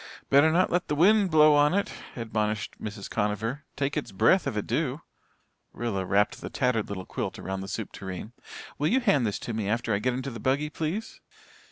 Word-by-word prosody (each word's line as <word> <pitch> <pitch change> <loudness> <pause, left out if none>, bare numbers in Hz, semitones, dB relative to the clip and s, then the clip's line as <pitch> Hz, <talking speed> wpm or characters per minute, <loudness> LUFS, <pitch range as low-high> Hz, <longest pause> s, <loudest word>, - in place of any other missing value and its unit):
"Better 145 +3 +6
not 180 +3 +3
let 175 0 0
the 150 - 0
wind 195 +5 +5
blow 155 -2 +6
on 145 +4 +4
it," 200 - 0 0.2
admonished 110 -3 -2
Mrs. 105 -2 -6
Conover. 110 +6 -2
"Take 140 +1 -1
its 150 - -3
breath 180 - +3
if 105 - -2
it 105 - -1
do." 135 +4 -1 0.7
Rilla 105 -6 -2
wrapped 105 +6 +1
the - - -5
tattered 125 -5 0
little 95 -2 -5
quilt - - -4
around 95 0 -4
the 95 - -6
soup 110 +1 -4
tureen. 95 +4 -7 0.5
"Will 150 - +2
you 255 +9 +3
hand 170 - +3
this 105 - -2
to 120 - -5
me 110 -2 -2
after 115 0 0
I 100 - +1
get 125 +3 0
into 130 +1 -4
the 115 - -7
buggy, 140 +6 0
please?" 165 +9 -4
125 Hz, 205 wpm, -27 LUFS, 105-150 Hz, 0.7 s, Better